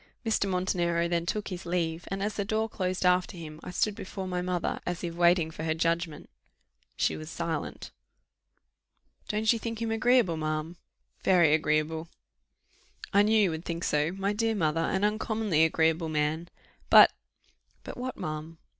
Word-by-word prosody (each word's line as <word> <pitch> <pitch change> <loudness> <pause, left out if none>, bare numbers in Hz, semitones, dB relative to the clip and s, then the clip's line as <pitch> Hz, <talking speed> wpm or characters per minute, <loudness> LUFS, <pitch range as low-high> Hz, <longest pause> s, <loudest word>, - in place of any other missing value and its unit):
Mr. 215 -3 +1
Montenero 175 -2 0
then 170 0 -1
took 210 +3 -2
his 180 -2 -6
leave, 170 -1 -2
and 195 +1 -3
as 210 +1 -1
the 200 - -2
door 220 +2 0
closed 185 -3 -2
after 180 0 +2
him, 155 -2 -8
I - - -8
stood 205 +4 0
before 190 -2 -6
my 180 -1 -2
mother, 180 -1 -2
as 175 0 -4
if 170 -1 -3
waiting 170 -1 +3
for 160 0 -3
judgment; 165 -1 -1 0.7
she 80 - +1
was 80 0 -8
silent. - - -4 1.4
"Don't 215 +2 +2
you 230 - -3
think 230 0 -4
him 230 -1 -2
agreeable, 225 -6 +3
ma'am?" 155 +2 -3 0.5
"Very 175 -5 +5
agreeable." 155 +1 0 1.1
"I 200 - +6
knew 215 +1 +4
you 195 -5 +3
would 160 +1 -5
think 170 0 -4
so, 150 +2 +1
my 195 +1 -1
dear 225 +1 0
mother; 165 -4 +1
an 190 +4 0
uncommonly 210 -5 +1
agreeable 160 0 +1
man." 155 +2 -1 0.4
"But - - +9 0.3
" - - -39
"But - - -7
what, 255 0 -5
ma'am?" 155 +1 -5
175 Hz, 165 wpm, -28 LUFS, 160-205 Hz, 1.4 s, But